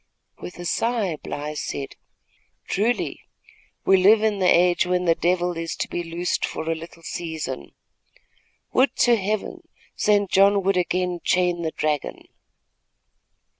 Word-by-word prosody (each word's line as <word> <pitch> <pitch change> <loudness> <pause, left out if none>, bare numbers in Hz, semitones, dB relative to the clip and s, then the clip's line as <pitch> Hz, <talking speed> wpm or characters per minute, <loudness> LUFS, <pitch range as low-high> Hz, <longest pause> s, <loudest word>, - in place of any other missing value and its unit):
With 180 - -9
a 175 - -7
sigh, 215 -3 0
Bly 150 +1 -5
said: 140 -2 -5 0.7
"Truly, 225 +5 0 0.7
we 190 - +6
live 210 +4 +5
in 215 -2 +1
the 185 - +2
age 175 0 +4
when 180 0 0
the 165 - +5
devil 175 +1 0
is 165 -1 -4
to - - -3
be 175 - -4
loosed 170 +1 -2
for 160 - -3
a 165 - +1
little 165 +1 -10
season. 160 - -5 1.0
Would 260 +2 +3
to 240 -1 +5
Heaven, 210 0 -3 0.3
St. 205 -2 +2
John 195 +1 +4
would 195 +1 +2
again 180 0 0
chain 180 -2 +1
the 160 - -1
dragon." 155 -2 -2
180 Hz, 140 wpm, -23 LUFS, 165-195 Hz, 1.0 s, we